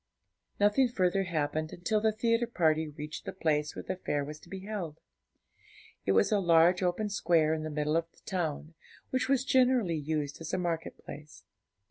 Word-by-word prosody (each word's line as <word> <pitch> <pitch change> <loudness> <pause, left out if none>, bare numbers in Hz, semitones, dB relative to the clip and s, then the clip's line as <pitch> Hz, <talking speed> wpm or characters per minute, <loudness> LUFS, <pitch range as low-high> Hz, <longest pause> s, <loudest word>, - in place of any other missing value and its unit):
Nothing 210 +6 +4
further 195 -3 +1
happened 155 -2 -2
until 210 +5 -1
the 220 0 +3
theatre 230 +2 +1
party 160 -7 +1
reached 150 +2 -7
the - - -3
place 150 -4 0
where - - -6
the - - -4
fair 145 -5 -2
was 150 +1 -8
to - - -18
be 190 -1 -6
held. 190 -7 -5 1.1
It 95 - +4
was 95 - +3
a 210 - +3
large 170 0 +4
open 180 +4 0
square 165 -5 +2
in 160 - -2
the 155 - -4
middle 150 0 -1
of 165 0 -1
the - - -26
town, 160 -4 -3 0.4
which 260 0 0
was 270 -1 +2
generally 250 -10 +3
used 150 0 -3
as 160 - -6
a - - 0
market 170 -3 -3
place. 150 +1 -10
170 Hz, 185 wpm, -30 LUFS, 155-205 Hz, 1.1 s, Nothing